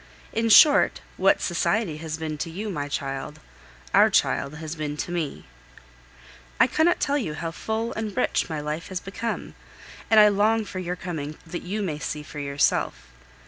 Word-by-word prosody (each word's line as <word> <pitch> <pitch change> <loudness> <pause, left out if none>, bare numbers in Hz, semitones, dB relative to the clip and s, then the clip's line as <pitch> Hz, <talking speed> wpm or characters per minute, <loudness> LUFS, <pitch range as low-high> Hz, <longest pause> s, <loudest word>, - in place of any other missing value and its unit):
In 225 0 +1
short, 285 +7 +7 0.2
what - - +3
society 200 -9 0
has 160 0 -5
been 160 -1 -4
to 165 - -3
you, 205 +6 -5
my 145 -5 -3
child 135 -1 -4 0.5
our - - +6
child 140 +2 +1
has 160 0 -6
been 150 -2 -4
to 175 - -4
me! 165 -5 -3 1.1
I - - +7
cannot 340 +3 +2
tell 285 +1 +1
you 160 - -3
how 165 +1 -4
full 220 +6 -3
and 215 -3 -5
rich - - +1
my 155 -2 -3
life 150 +3 -4
has 185 -2 -4
become, 225 +5 -5 0.6
and 220 - +7
I 210 - +9
long 215 +2 +2
for 190 -2 -6
your 180 -1 -3
coming 155 -5 -5
that 175 +1 -6
you 205 +4 -3
may 155 -6 -3
see 150 -1 -4
for 150 0 -9
yourself. 140 - 0
170 Hz, 180 wpm, -25 LUFS, 150-215 Hz, 1.1 s, I